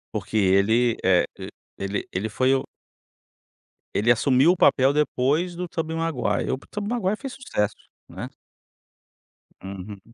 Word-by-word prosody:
Porque 110 - -2
ele, 110 +4 +3
eh, 90 -1 +4 0.5
ele 100 +1 -3
ele 100 +5 -2
foi 130 +5 +2
o 135 - -2 1.3
Ele 110 +4 +4
assumiu 130 +6 +4
o 180 - 0
papel 135 -4 +4
depois 150 +4 +1
do 180 0 -5
Tobey 160 -1 -3
Maguire, 135 -11 -1
o - - -1
Tobey 205 0 -4
Maguire 215 -4 0
fez 270 +2 -6
sucesso, 105 - -2 0.3
né. - - -6 1.4
Uhum. 95 +1 -8
130 Hz, 130 wpm, -24 LUFS, 105-165 Hz, 1.4 s, eh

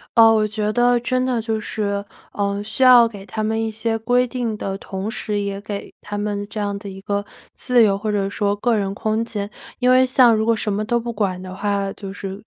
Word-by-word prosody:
哦， 225 -1 +8
我 215 -1 +2
觉 210 0 -2
得 245 +1 +3
真 255 +1 0
的 250 -3 0
就 220 0 -2
是， 200 -1 -3 0.3
嗯， 200 0 -1
需 215 +5 -1
要 250 -2 +8
给 200 -4 -10
他 215 +2 -4
们 220 +1 0
一 225 - -1
些 225 +1 -1
规 245 +3 +2
定 240 -3 -3
的 195 -1 -4
同 195 +2 -5
时， 210 -2 -2
也 200 -1 -3
给 200 0 -7
他 205 0 -5
们 205 -1 -3
这 - - -9
样 205 -1 -2
的 200 - -9
一 190 0 -9
个 200 0 -2 0.3
自 245 -2 +3
由 195 -2 +3
或 215 +1 -3
者 195 -1 0
说 205 0 0
个 225 +2 +1
人 195 -1 -2
空 220 +2 -1
间。 205 -3 -4 0.3
因 250 0 +3
为 255 0 +6
像 255 -2 +5
如 220 - 0
果 230 0 +3
什 210 -1 -2
么 210 +2 -1
都 235 +2 +1
不 235 0 -4
管 195 -4 -2
的 185 0 -8
话， 200 0 -1
就 195 -2 -8
是， 195 0 -7
215 Hz, 255 characters per minute, -21 LUFS, 200-230 Hz, 0.3 s, 哦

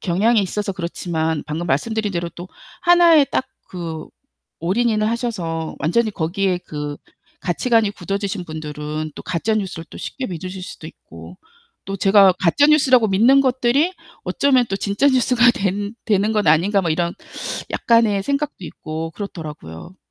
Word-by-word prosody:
경향이 205 +5 +2
있어서 200 +2 -2
그렇지만 170 -3 -2
방금 160 +3 -4
말씀드린 210 - -1
대로 170 -1 -2
또 175 +2 -10 0.3
하나의 340 -4 +6
딱 - - 0 0.2
그 165 -3 -6 0.5
올인인을 215 +4 +1
하셔서 185 -9 -3
완전히 215 +9 +1
거기에 180 +2 -1
그 145 -1 -5 0.4
가치관이 220 +4 +1
굳어지신 200 -2 -4
분들은 155 -1 -5
또 - - -7
가짜 185 +5 -1
뉴스를 190 -5 -3
또 - - -10
쉽게 260 - -5
믿으실 185 +1 -6
수도 - - -9
있고 - - -13 0.5
또 195 0 -4
'제가 195 0 +6
가짜 190 - +3
뉴스라고 260 -7 +4
믿는 235 +8 +5
것들이 260 +6 +2 0.3
어쩌면 255 +7 +2
또 195 - 0
진짜 200 +7 0
뉴스가 250 -2 +4
된 205 +2 -2
되는 210 0 +2
건 210 -4 0
아닌가?' 180 +7 +4
뭐 165 - -1
이런 170 +2 0 0.6
약간의 225 -4 +2
생각도 280 -7 -2
있고 160 +1 -6
그렇더라고요. 155 - -8
195 Hz, 335 characters per minute, -20 LUFS, 170-230 Hz, 0.6 s, 하나의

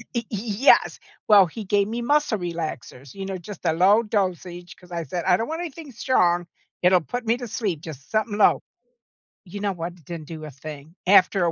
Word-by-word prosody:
Y 235 -1 -1
y 210 - -3 0.3
yes. - - +4 0.3
Well, 200 -3 +7
he 215 +6 -8
gave 200 +1 +2
me 230 +2 -3
muscle 290 -4 +2
relaxers, 160 -7 -6
you 195 -1 -6
know, 190 -1 -4
just 185 +2 -10
a 160 - +3
low 200 +6 +5
dosage, 180 -4 -3
'cause 180 -1 -19
I 170 -1 -2
said, 175 +5 -4
"I 180 -1 +5
don't 225 - -3
want 325 +2 -3
anything 320 -4 -7
strong. 175 -8 +1 0.4
It'll 180 0 +5
put 245 +7 -5
me 230 +2 +2
to 245 - -6
sleep, 205 -7 -2
just 145 -5 -10
somethin' 215 -1 -1
low." 210 - +4 0.8
You 200 +3 -8
know 200 -1 0
what, 170 0 -5
it 165 -6 -21
didn't 165 -3 -7
do 160 -2 -8
a 150 - -7
thing. 150 +3 -10
After 190 -1 +5
a 170 - +1
185 Hz, 215 wpm, -24 LUFS, 170-215 Hz, 0.8 s, Well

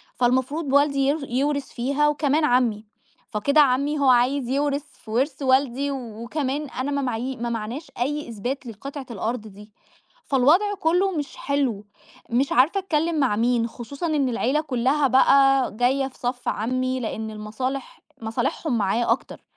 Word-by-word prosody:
فالمفروض 260 +4 0
والدي 280 -1 +3
ير 300 +3 +1
يورث 280 +2 -1
فيها 280 +5 +1
وكمان 300 +1 +2
عمي، 240 -5 +1 0.4
فكده 280 +8 +3
عمي 285 +2 +2
هو 275 -2 +4
عايز 250 +1 +3
يورث 285 +1 0 0.2
في 215 - -9
ورث 265 +4 0
والدي 270 +1 +2
وكمان 265 +4 -4
أنا 260 +4 -3
ما 280 0 0
معايي 250 +1 -3
ما 235 +1 -3
معاناش 235 +7 -5
أي 295 +1 -2
إثبات 245 +5 -4
للقطعة 270 +5 -7
الأرض 225 +2 -3
دي، 210 +1 -14 0.5
فالوضع 315 +11 +3
كُلُّه 365 +3 +2
مش 295 -5 -4
حلو. 260 -8 -1 0.4
مش 255 +4 +1
عارفة 295 +11 +4
أتكلم 325 -3 0
مع 255 -7 +2
مين، 235 +1 +1
خصوصًا 275 +8 -6
إن 290 -5 +1
العيلة 255 +5 +1
كُلّها 270 +1 +1
بقى، 270 0 +4
جاية 265 +2 +2
في 260 - -15
صف 245 0 -3
عمي 255 +3 -1
لأن 220 -1 -4
المصالح 245 +6 -5 0.2
مصالحهم 240 +4 -1
معاه 220 +3 +1
أكتر، 235 - -3
265 Hz, 150 wpm, -24 LUFS, 240-285 Hz, 0.5 s, هو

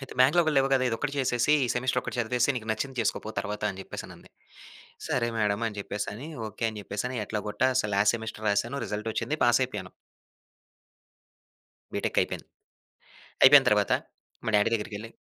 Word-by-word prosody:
"అయితే 135 - -9
బ్యాక్‌లాగ్‌లు 155 +4 +5
లేవు 135 0 +4
కదా! 130 -1 +3
ఇదొక్కటి 130 +5 -2
చేసేసి 125 +2 +2
ఈ - - 0
సెమిస్టర్ 125 0 0
ఒకటి - - -5
చదివేసి, 125 +3 +1
నీకు 110 -1 -6
నచ్చింది 130 +4 -3
చేసుకోపో 110 - -1
తర్వాత" 105 +1 -4
అని 95 0 -8
చెప్పేసనంది. - - -9 0.8
సరే 120 -2 0
మేడమ్ 105 +1 +1
అని 105 - -11
చెప్పేసని, 105 +7 -5 0.2
ఓకే. 110 +2 -8
అని 105 - -8
చెప్పేసని 125 +6 -3
ఎట్లాగోట్టా 105 +5 0 0.3
లాస్ట్ 105 +3 +4
సెమిస్టర్ 110 -1 -7
రాసాను. 115 +7 0
రిజల్ట్ 105 +2 -3
వచ్చింది. 155 - -2
పాస్ 120 +2 +4
అయిపోయాను. 100 -7 -5 2.0
బిటెక్ - - -1
అయి‌‌పేంది. - - -2 1.0
అయిపోయిన - - +9
తర్వాత, - - +2 0.5
మా - - -2
డాడీ 105 +2 +4
దగ్గరికెళ్లి 110 0 -5
115 Hz, 150 wpm, -27 LUFS, 105-130 Hz, 2.0 s, అయిపోయిన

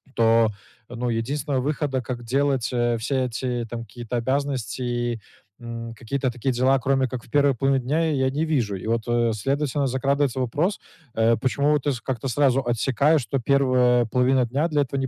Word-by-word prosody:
То, 115 -1 +4 0.4
ну, 120 0 -3
единственного 130 +4 -1
выхода, 140 -1 -1
как 120 0 -6
делать, 135 0 0
э, 120 -1 +1
все 115 +5 -2
эти, 125 0 -3
там, 120 0 -5
какие-то 120 +3 -5
обязанности 130 -1 -2
и, 120 -1 -2 0.4
м, 115 -1 -7
какие-то 125 +3 -2
такие 125 +2 -2
дела, 130 +2 +3
кроме 135 +1 +1
как 125 -2 -6
в - - -19
первой 140 -1 +4
половине 135 +1 +1
дня, 160 +4 +1
и - - 0
я 130 0 +2
не 150 +4 -1
вижу. 125 -11 0
И 95 - -7
вот, 115 0 0
э, 120 -1 +2
следовательно, 140 +5 -1
закрадывается 135 0 0
вопрос, 150 - 0 0.4
э, 115 +1 +3
почему 140 +3 +1
вот 150 -2 +1
ты - - +3
с 125 - -5
как-то 130 -1 -3
сразу 135 +1 +2
отсекаешь, 135 +6 +2
что 135 +3 -2
первая 125 -2 +3
половина 125 +2 +2
дня 140 +7 0
для 150 -3 +1
этого 140 0 -2
не 135 - -1
130 Hz, 190 wpm, -24 LUFS, 120-140 Hz, 0.4 s, То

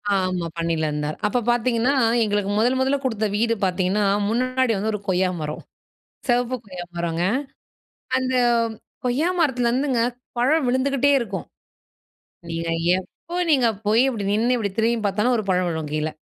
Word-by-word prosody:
ஆமா, 185 -2 0
பணியில 165 -2 0
இருந்தாரு. 150 +1 -3
அப்போ 245 +4 0
பார்த்தீங்கன்னா, 240 +2 +1 0.3
எங்களுக்கு 205 -1 0
முதல் 250 +3 +2
முதலில 265 +2 +2
கொடுத்த 220 -3 0
வீடு 230 +1 +2
பார்த்தீங்கன்னா 185 +3 +1 0.3
முன்னாடி 255 +1 +1
வந்து 215 +3 -1
ஒரு 210 - -2
கொய்யா 185 0 +2
மரம், 150 0 -5 0.6
சிவப்பு 245 +1 +1
கொய்யா 180 -3 -7
மரங்க, 170 0 -1 1.0
அந்த 260 0 -1 0.7
கொய்யா 280 +8 +1
மரத்துலருந்துங்க 250 -2 +1 0.4
பழம் 275 +3 +2
விழுந்துகிட்டே 275 +2 +2
இருக்கும். 195 -5 -4 1.0
நீங்க 165 0 -3 0.3
எப்போ 340 - -10 0.2
நீங்க 255 -5 +4 0.2
போய் 225 +4 +4
அப்படி 220 -5 -4
நின்னு 235 +4 +2
இப்படி 200 -4 -2
திரும்பி 230 +1 +2
பார்த்தாலும் 215 +5 +1
ஒரு 215 - -2
பழம் 180 -1 +2
விழும் 160 -2 -3
கீழே. 155 +1 -1
225 Hz, 140 wpm, -23 LUFS, 185-255 Hz, 1.0 s, நீங்க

